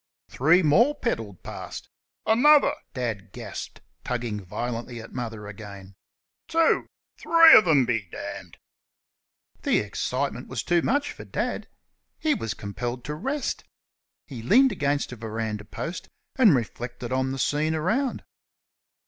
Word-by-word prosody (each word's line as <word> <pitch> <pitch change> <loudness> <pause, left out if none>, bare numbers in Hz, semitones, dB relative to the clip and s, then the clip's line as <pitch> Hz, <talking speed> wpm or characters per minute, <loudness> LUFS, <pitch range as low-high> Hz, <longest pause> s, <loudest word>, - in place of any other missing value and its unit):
Three 165 +7 +4
more 235 - +4
pedalled 115 - -3
past. - - -7 0.4
"Another!" 285 +7 +5 0.2
Dad 110 -6 -3
gasped, - - -7 0.2
tugging 115 -4 -3
violently 120 +5 -5
at 115 - -11
Mother 115 -4 -5
again 100 -2 -10 0.5
"two 330 0 +2 0.3
three 330 -1 +8
of 215 - +7
'em, 145 -6 +5
be 110 -6 -1
d - - -8 0.3
d!" - - -18 1.0
The - - +2
excitement 125 +5 -3
was - - -4
too 175 -1 +2
much 285 - 0
for - - -10
Dad. - - -3 0.5
He 310 -1 +1
was 115 - -3
compelled 120 +4 -5
to 150 - -3
rest. 270 - -3 0.6
He 125 -5 -8
leaned 250 - +5
against 145 -2 -1
a - - -6
verandah 110 -1 -4
post 165 - -6 0.3
and 225 - +6
reflected 120 +1 -4
on 130 0 0
the 135 - -4
scene 150 +4 0
around. 225 - 0
130 Hz, 135 wpm, -25 LUFS, 115-190 Hz, 1.0 s, three